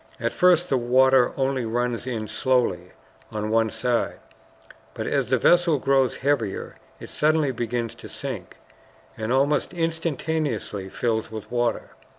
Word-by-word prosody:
At 115 0 -1
first 180 -1 +4
the 135 - +1
water 130 +1 +4
only 135 -1 0
runs 120 +1 -2
in 110 -4 -3
slowly 115 -7 0 0.4
on 105 0 -3
one 115 0 +3
side, 115 +2 -1 0.8
but - - -4
as - - 0
the - - +3
vessel 175 -3 +4
grows 135 -1 +2
heavier 130 -7 -1 0.2
it - - -10
suddenly 155 -2 +2
begins 120 -1 -3
to - - -9
sink, - - -6 0.6
and 110 +1 -3
almost 145 +6 +1
instantaneously 160 - -2
fills 110 +1 -1
with 110 0 -8
water. 120 -1 -1
125 Hz, 140 wpm, -24 LUFS, 115-145 Hz, 0.8 s, first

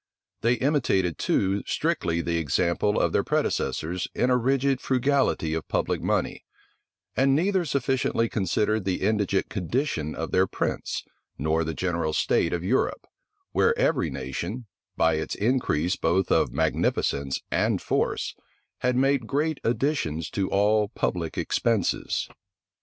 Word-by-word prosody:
They 120 +2 +3
imitated 120 - +1
too 100 +1 +1
strictly 90 - 0
the 85 0 -1
example 85 +6 +1
of - - +2
their - - +2
predecessors 85 +3 -1
in 125 - +2
a - - +5
rigid 135 +2 +1
frugality 130 - +1
of 80 -1 -3
public - - -1
money; - - -1 0.7
and 135 +1 +3
neither 185 +3 +2
sufficiently 130 -4 0
considered 105 +1 0
the 95 -1 -1
indigent 100 -1 +1
condition 95 - -2
of 80 - -4
their 95 +1 +3
prince, - - -3 0.3
nor 80 +3 +1
the 80 0 -4
general 85 -4 -1
state 85 - +2
of 85 -1 -2
Europe, 115 +8 0 0.5
where - - +2
every - - +2
nation, 85 - -5 0.3
by 80 -1 +3
its 80 - -3
increase 100 - +1
both 90 +3 +1
of - - +3
magnificence 70 -1 0
and - - +1
force, - - -1 0.5
had 125 0 +1
made 135 -2 +2
great 150 +3 0
additions 115 - -1
to 95 -2 -1
all 105 +1 +3
public 90 -6 -2
expenses. 115 -6 0
100 Hz, 135 wpm, -26 LUFS, 85-130 Hz, 0.7 s, a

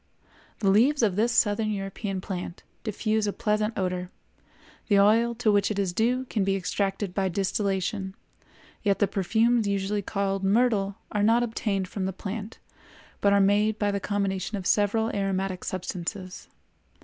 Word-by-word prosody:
The 195 -2 +4
leaves 250 +7 +4
of 200 -5 +2
this 225 +4 +2
Southern 215 -1 +2
European 195 -1 -3
plant 180 -2 -6 0.2
diffuse 215 0 0
a - - +1
pleasant 215 +1 -1
odor; 180 -1 -2 0.8
the 205 - +4
oil 230 +4 +4
to 225 -2 +2
which 205 -1 +2
it 210 - -3
is 195 -3 0
due 245 +6 +1
can 215 -5 -1
be 195 0 +1
extracted 195 +1 -2
by 190 -1 0
distillation; 190 +1 -1 0.7
yet 200 -2 +2
the 205 - +2
perfumes 225 +4 +2
usually 200 +1 -1
called 195 0 -2
myrtle 200 -1 +2 0.2
are 210 - 0
not 230 +3 +4
obtained 205 -4 -2
from 190 +1 -4
the 190 - -2
plant, 205 +3 -6 0.6
but 200 - +3
are 200 - +5
made 205 +2 +3
by 205 -1 +1
the 200 - -1
combination 200 0 -2
of 190 - -6
several 220 +3 +2
aromatic 195 -2 -1
substances. 185 +1 -5
200 Hz, 160 wpm, -26 LUFS, 195-215 Hz, 0.8 s, are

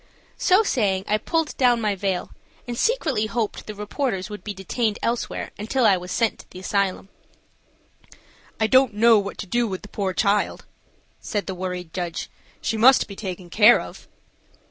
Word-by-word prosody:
So 380 +4 +4
saying, 200 - 0
I 210 +1 +1
pulled 325 +6 -1
down 245 -2 +4
my 210 -2 0
veil 190 -2 -2 0.4
and 240 - -3
secretly 235 - +1
hoped 225 -2 -3
the 215 - -6
reporters 210 -1 -3
would 210 - -8
be 210 - -4
detained 205 +3 -2
elsewhere 235 +1 -2
until 230 +4 0
I 200 - +6
was 180 0 -6
sent 230 -2 0
to - - -15
the - - -12
asylum. 195 0 -1 1.5
"I 220 - +3
don't 255 -1 +4
know 225 0 +6
what 200 0 -5
to - - -5
do 240 +4 0
with 190 -1 -5
the 205 - -11
poor 195 -2 -2
child," 205 0 +1 0.5
said 205 -3 -3
the 190 - -4
worried 180 -2 -5
judge. 175 -2 -4 0.3
"She 225 - -1
must 255 +4 +6
be 200 - -9
taken 185 -3 -7
care 215 +5 +7
of." - - -10
210 Hz, 175 wpm, -23 LUFS, 190-235 Hz, 1.5 s, care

